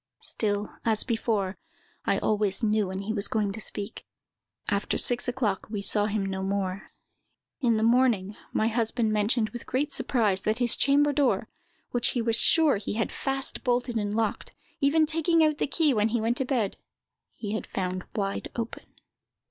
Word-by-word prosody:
Still, 205 Hz, -1 st, -1 dB
as 220 Hz, -2 st, +1 dB
before, 220 Hz, -5 st, -1 dB, 0.5 s
I -, -, +2 dB
always 210 Hz, 0 st, 0 dB
knew 215 Hz, -2 st, +2 dB
when 190 Hz, +1 st, -4 dB
he 215 Hz, +2 st, -3 dB
was 205 Hz, -2 st, -1 dB
going 210 Hz, -2 st, 0 dB
to 220 Hz, +2 st, -6 dB
speak. 205 Hz, +1 st, -3 dB, 0.6 s
After 200 Hz, -1 st, 0 dB
six 245 Hz, +1 st, +3 dB
o'clock, 240 Hz, -6 st, -1 dB
we 205 Hz, -2 st, -4 dB
saw 205 Hz, +1 st, +3 dB
him 210 Hz, -2 st, -1 dB
no 190 Hz, 0 st, -3 dB
more. 195 Hz, 0 st, -2 dB, 0.7 s
In 235 Hz, -5 st, +2 dB
the 215 Hz, -, 0 dB
morning, 230 Hz, -4 st, +3 dB, 0.2 s
my 220 Hz, -, +1 dB
husband 225 Hz, -1 st, 0 dB
mentioned, 215 Hz, +1 st, +2 dB
with 240 Hz, -, -8 dB
great 285 Hz, +3 st, -1 dB
surprise, 210 Hz, -7 st, +1 dB
that 215 Hz, +2 st, 0 dB
his 245 Hz, -2 st, +3 dB
chamber 290 Hz, +1 st, +3 dB
door, 280 Hz, -2 st, +1 dB, 0.4 s
which 245 Hz, 0 st, +1 dB
he -, -, +2 dB
was 225 Hz, -1 st, +2 dB
sure 310 Hz, 0 st, +4 dB
he 200 Hz, -, -4 dB
had 225 Hz, +1 st, -1 dB
fast 270 Hz, 0 st, -1 dB
bolted 245 Hz, -1 st, 0 dB
and 205 Hz, -1 st, -1 dB
locked, 225 Hz, -2 st, -2 dB, 0.2 s
even 310 Hz, +2 st, +4 dB
taking 325 Hz, +1 st, +2 dB
out 305 Hz, -1 st, +2 dB
the -, -, +1 dB
key 300 Hz, 0 st, +2 dB
when 215 Hz, -2 st, +2 dB
he 235 Hz, +1 st, 0 dB
went 230 Hz, +2 st, 0 dB
to 265 Hz, -, 0 dB
bed, 240 Hz, -7 st, -1 dB, 0.5 s
he 205 Hz, -3 st, -6 dB
had 220 Hz, -, -3 dB
found 185 Hz, -1 st, -3 dB
wide 195 Hz, -2 st, -2 dB
open." 230 Hz, -1 st, -6 dB
220 Hz, 180 wpm, -27 LUFS, 205-250 Hz, 0.7 s, sure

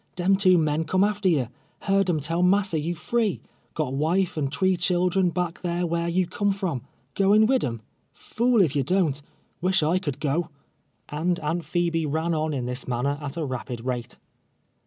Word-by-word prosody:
Dem 185 Hz, +2 st, +3 dB
two 185 Hz, -2 st, +5 dB
men 155 Hz, -1 st, +1 dB
come 185 Hz, +4 st, +2 dB
after 205 Hz, -2 st, +1 dB
ye. 140 Hz, -8 st, +1 dB, 0.3 s
Heard 195 Hz, -1 st, +2 dB
'em 160 Hz, -3 st, +1 dB
tell 165 Hz, +4 st, -1 dB
rnassa 185 Hz, -3 st, +3 dB
you 170 Hz, +3 st, -2 dB
free 220 Hz, +2 st, 0 dB, 0.2 s
— 120 Hz, -, -39 dB
■ -, -, -38 dB
got 130 Hz, -, -1 dB
wife 165 Hz, +6 st, +1 dB
and 140 Hz, -3 st, -1 dB
tree 185 Hz, +6 st, +2 dB
children 180 Hz, +1 st, +1 dB
back 175 Hz, 0 st, -3 dB
thar 175 Hz, -1 st, -2 dB
wliar 170 Hz, 0 st, -1 dB
you 185 Hz, +1 st, +2 dB
ccmie 200 Hz, +3 st, -1 dB
from. 175 Hz, -10 st, -2 dB, 0.3 s
Goin' 205 Hz, +2 st, +4 dB
wid 260 Hz, +3 st, +2 dB
'em? 115 Hz, -2 st, -3 dB, 0.3 s
Fool 235 Hz, -2 st, +1 dB
if 150 Hz, -5 st, -1 dB
ye 140 Hz, -, +2 dB
don't 150 Hz, -1 st, +1 dB, 0.2 s
— -, -, -42 dB
wish 185 Hz, -2 st, +2 dB
I 165 Hz, +4 st, +2 dB
could 145 Hz, -8 st, -4 dB
go," 155 Hz, +3 st, -1 dB, 0.6 s
and 170 Hz, +4 st, -1 dB
Aunt 165 Hz, +3 st, -2 dB
Phebe 170 Hz, -2 st, 0 dB
ran 160 Hz, +3 st, -1 dB
on 155 Hz, 0 st, 0 dB
in 130 Hz, -4 st, -2 dB
this 125 Hz, +2 st, -5 dB
manner 135 Hz, +4 st, -1 dB
at 145 Hz, +1 st, -6 dB
a 160 Hz, -, -1 dB
rapid 125 Hz, -2 st, -5 dB
rate. 125 Hz, -2 st, -4 dB
170 Hz, 200 wpm, -25 LUFS, 150-185 Hz, 0.6 s, two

